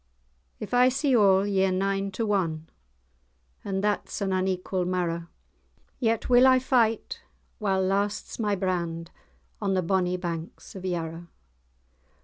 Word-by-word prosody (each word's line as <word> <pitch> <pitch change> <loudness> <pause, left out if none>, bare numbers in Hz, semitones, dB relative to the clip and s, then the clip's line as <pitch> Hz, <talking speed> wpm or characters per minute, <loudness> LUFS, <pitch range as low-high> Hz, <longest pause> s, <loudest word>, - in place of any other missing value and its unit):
"If - - -7
I 250 +1 +6
see 270 0 +1
all, 195 -3 +5
ye're 195 -2 +2
nine 195 +1 0
to 210 +1 -1
ane; 165 -5 -1 1.0
And 195 0 -2
that's 210 0 -1
an 195 -2 -1
unequal 185 0 -1
marrow; 175 -2 -2 0.7
Yet 225 -3 0
will 250 +1 +6
I 260 0 +6
fight, 245 -4 +1 0.4
while 195 -3 +1
lasts 200 +4 -1
my 210 -2 +1
brand, 170 -3 -2 0.5
On 195 -2 0
the 185 - +1
bonnie 180 0 +1
banks 170 -2 -6
of 190 -1 -8
Yarrow." 170 -1 -4
190 Hz, 130 wpm, -26 LUFS, 180-210 Hz, 1.0 s, I